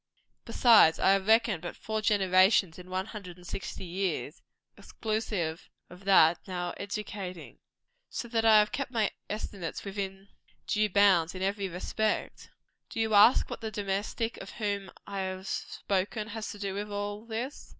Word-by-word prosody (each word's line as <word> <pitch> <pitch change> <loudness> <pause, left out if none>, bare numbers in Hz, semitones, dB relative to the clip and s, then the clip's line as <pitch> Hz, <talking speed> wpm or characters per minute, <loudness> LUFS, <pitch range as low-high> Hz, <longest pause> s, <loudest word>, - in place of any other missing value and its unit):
Besides, 220 -10 +6
I 190 - +4
have 195 0 +1
reckoned 220 -5 +4
but 175 - -6
four 220 0 -3
generations 190 -3 +3
in 180 0 -11
one 185 +1 -2
hundred 200 -5 -9
and 180 - -15
sixty 185 +1 -6
years, 185 +2 -3 0.3
exclusive 210 -7 -3 0.2
of 180 +2 -13
that 175 -4 +6
now 175 -2 -3
educating. 200 -3 -6 0.5
So 240 - -5
that 225 -1 +1
I 220 -1 +7
have 210 0 +4
kept 275 -1 -3
my 225 -5 0 0.2
estimates 200 -5 -5
within 195 0 -5 0.4
due 215 0 +1
bounds 190 -4 +4
in 185 - -4
every 195 0 -1
respect. 210 +5 -2 0.4
Do - - -5
you 220 -1 +1
ask 210 +4 +6
what - - -7
the 220 - -3
domestic 205 +3 -2
of 195 - -9
whom 200 -3 -3 0.2
I 200 -1 -5
have 190 0 -4
spoken 205 +3 -2
has 220 0 -5
to 205 - -7
do 200 -1 -3
with 205 +1 -4
all 205 +1 -4
this? 235 +5 -5
200 Hz, 160 wpm, -29 LUFS, 185-215 Hz, 0.5 s, I